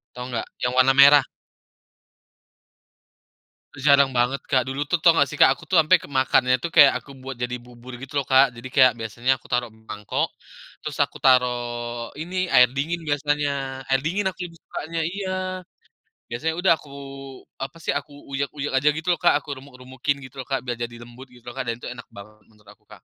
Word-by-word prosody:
tahu 125 0 -6
nggak? 115 - -2
Yang 125 0 -1
warna 130 +1 +5
merah. 140 0 +8 2.5
Udah 135 - -10
jarang 140 -1 +3
banget 125 +3 +1
Kak, 130 -1 +2
dulu 135 +2 -2
tuh, 165 +3 -1
tahu 165 0 +5
enggak 140 -3 +3
sih - - -8
Kak, - - +8
aku - - -15
tuh 185 - +3
ampe 160 +4 +5
kemakannya 130 -2 +2
tuh, - - 0
kayak, 145 -3 +9
aku - - -21
buat 135 -1 -6
jadi 125 0 -2
bubur, 125 +1 -13
gitu 135 - -10
loh 135 - -5
Kak. 135 +1 +7
Jadi, 120 +2 -8
kayak, 130 -2 +7
biasanya 120 +4 -1
aku - - -19
taruh 120 -2 0
mangkok, 110 -2 -4 0.6
terus - - -5
aku - - 0
taruh 125 -2 +4 0.6
ini, 180 +3 -7 0.2
air 125 0 +7
dingin 165 +5 -2
biasanya, 145 0 0 0.4
air 135 0 +2
dingin 190 +5 -1
aku 190 - -5
lebih 165 -2 -10
sukanya 165 +2 -6
iya. 190 +1 -4 1.0
Biasanya, 160 +7 -2
udah 190 - +4
aku, 145 - -16 0.7
apa 135 +5 -6
sih, - - 0
aku - - -18 0.2
uyek-uyek 140 +1 -3
aja, 145 +3 +1
gitu 160 +2 -6
loh 170 - 0
Kak, - - +4
aku - - -14
remuk-remukin, 130 +1 -4
gitu 130 +1 -12
loh 130 - -7
Kak. 135 -1 -2
Biar 120 -2 -4
jadi 120 0 -5
lembut, 120 +3 -13
gitu 125 -1 -19
loh - - -16
Kak, - - 0
dan 115 - -1
itu 120 - -10
enak 125 -1 -10
banget 105 +2 -13
menurut 105 -2 -22
aku - - -24
Kak. - - -16
135 Hz, 200 wpm, -23 LUFS, 125-145 Hz, 2.5 s, kayak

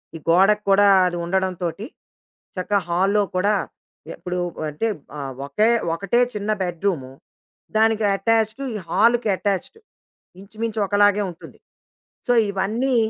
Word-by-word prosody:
ఈ - - -4
గోడకు 195 +5 +4
కూడా 200 +1 +5 0.2
అది 175 -1 -1
ఉండడంతోటి 185 +1 -2 0.7
చక్కగా 200 +2 0
హాల్‌లో 195 +4 +2
కూడా, 200 +3 +2 0.6
ఎప్పుడు 180 0 -5 0.3
అంటే 150 +10 -2 0.3
ఆహ్, 135 -2 -5
ఒకే 210 +11 +2 0.2
ఒకటే 200 +7 0
చిన్న 210 0 -4
బెడ్‌రూము. 175 -6 -2 0.7
దానికి 220 -1 +3
అటాచ్డ్ 220 +4 0
ఈ - - -5
హాల్‌కి 230 +2 +3
అటాచ్డ్. 200 - -3 0.6
ఇంచుమించొకలాగే 205 -1 +1
ఉంటుంది. 170 - -14 0.7
సో, 245 - +4 0.2
ఇవన్నీ 225 +7 -1
200 Hz, 110 wpm, -22 LUFS, 180-220 Hz, 0.7 s, కూడా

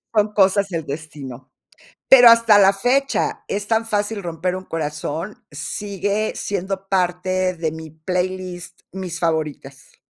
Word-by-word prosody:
Son 210 0 +3
cosas 200 0 +3
del 165 -4 -4
destino. 140 -4 -8 0.6
Pero 245 -3 +9
hasta 230 -2 +6
la 195 -1 +6
fecha 255 +7 0
"Es 205 +1 -3
tan 225 0 +1
fácil 205 -1 -2
romper 175 +2 -2
un 185 - -6
corazón", 155 +4 -4
sigue 200 +7 -2
siendo 195 0 -4
parte 185 0 0
de 165 -2 -2
mi 160 0 -8
playlist, 180 +2 -4
mis 185 -3 -5
favoritas. 155 -5 -4
185 Hz, 130 wpm, -21 LUFS, 160-205 Hz, 0.6 s, Pero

